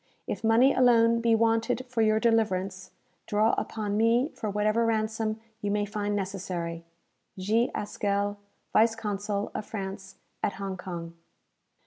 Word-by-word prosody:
If - - -4
money 230 +4 +5
alone 230 -2 +5
be 230 -1 +4
wanted 230 +3 +1
for 245 -2 -1
your 215 0 +3
deliverance, 195 -5 0 0.4
draw 215 +2 +3
upon 210 -2 -2
me 235 +5 +3
for 215 - -5
whatever 215 +3 +1
ransom 220 -1 0 0.2
you 205 - -1
may 205 0 +1
find 205 0 -2
necessary. 180 -4 -4 0.5
"G. 220 +6 +1
HASKELL, 205 0 -1 0.3
Vice 225 +1 +4
Consul 205 -1 -3
of - - -3
France 195 -2 -6 0.3
at 200 - 0
Hong 195 -1 -4
Kong." 170 -2 -7
215 Hz, 135 wpm, -28 LUFS, 200-225 Hz, 0.5 s, money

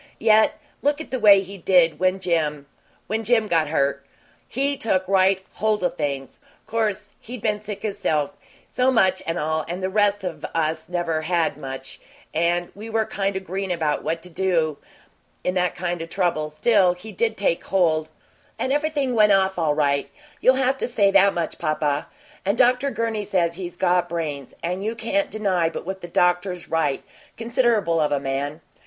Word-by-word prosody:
Yet, 220 -1 +4 0.2
look 290 +1 +1
at 315 - -8
the 260 - -1
way 200 -3 +7
he 195 +1 -9
did 170 -3 +3
when 185 +1 +2
Jim 155 -5 -1 0.4
when 220 +1 -2
Jim 225 0 +3
got 165 -6 +1
hurt. 140 -2 0 0.4
He 275 +3 0
took 190 -7 0
right 190 0 +3
hold 215 -1 0
o' 180 - +3
things. 145 -5 -4 0.3
'Course 215 -2 -2
he'd 240 -1 -9
been 210 -1 0
sick 210 -1 -7
himself 160 -7 -1 0.4
so 255 +1 +1
much 190 -7 +3
and 165 +1 -1
all 155 0 -1
and 180 +3 -5
the 190 - -1
rest 205 0 +2
of 165 -5 -5
us 160 0 -1
never 170 -3 -1
had, 165 -2 0
much, 135 -2 -8 0.3
and 175 +2 0
we 215 +3 -9
were 220 0 +1
kind 195 -1 -2
o' - - -1
green 190 +1 -4
about 160 -4 -1
what 165 0 -2
to 180 - -7
do 165 -4 0 0.6
in 180 - 0
that 180 -1 0
kind 175 -1 -3
o' 165 - -5
trouble 165 -4 -1
still, 180 +3 +3
he 205 +5 -10
did 220 +3 -1
take 190 -4 0
hold, 160 -5 +1 0.5
and 260 - -1
everything 295 -3 0
went 210 -2 +5
off 190 -1 +2
all 155 -3 +1
right; 140 -2 +1 0.3
you'll 255 - +5
have 265 0 +1
to - - -2
say 205 -5 +2
that 195 0 +5
much, 170 -2 -3
papa. 155 -2 -1 0.4
And 200 +4 0
Dr. 250 +2 +3
Gurney 230 -4 -2
says 180 -4 0
he's 175 0 -6
got 180 -1 +1
brains, 150 -5 -4
and 180 +3 -2
you 220 +2 -2
can't 290 +7 -1
deny 190 -6 0
but 165 - -7
what 190 +1 -5
the 175 - -7
doctor's 180 0 0
right 155 -4 0 0.3
considerable 230 -7 +1
of 150 -1 +1
a 145 - +1
man. 140 +3 -3
185 Hz, 185 wpm, -23 LUFS, 165-215 Hz, 0.6 s, way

